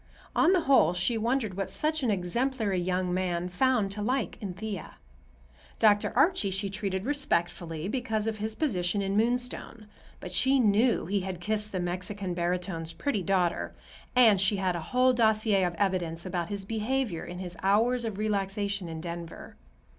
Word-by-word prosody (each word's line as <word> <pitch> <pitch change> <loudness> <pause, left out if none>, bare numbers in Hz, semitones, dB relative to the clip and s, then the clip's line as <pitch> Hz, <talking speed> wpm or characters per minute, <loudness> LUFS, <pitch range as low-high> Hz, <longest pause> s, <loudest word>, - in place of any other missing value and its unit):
On 335 - +5
the 370 -2 +4
whole, 270 - +4
she 180 +7 +1
wondered 225 -2 0
what 195 0 -3
such 310 0 0
an 250 - 0
exemplary 210 +2 0
young 180 0 -1
man 180 -1 -1
found 220 +1 +1
to 210 +1 -3
like 250 +3 -1
in 190 -4 -5
Thea. 205 -3 -6 0.8
Dr. 210 -2 +4
Archie 340 - +3
she 195 +1 -2
treated 195 -1 -3
respectfully 175 - -1
because 220 -2 -1
of 220 -1 -2
his 215 +1 -3
position 200 - 0
in 195 0 -1
Moonstone, 235 -1 -1 0.3
but 180 - -7
she 265 +8 +3
knew 225 +2 +3
he 200 +4 0
had 185 -2 -5
kissed 210 +3 -2
the 185 - -2
Mexican 185 +2 -2
barytone's 175 -1 -2
pretty 280 -9 -1
daughter, 180 -2 0 0.4
and 220 -6 +6
she 195 +2 +3
had 190 -2 0
a 170 - -3
whole 255 +1 +4
dossier 220 -4 +3
of 175 -1 -1
evidence 170 -3 -1
about 175 -2 -3
his 200 -1 -5
behavior 225 -3 -1
in 175 - -7
his 180 -1 -6
hours 230 +6 +2
of 220 -4 -4
relaxation 200 -2 -1
in 160 -1 -6
Denver. 170 -1 -7
200 Hz, 170 wpm, -28 LUFS, 180-225 Hz, 0.8 s, and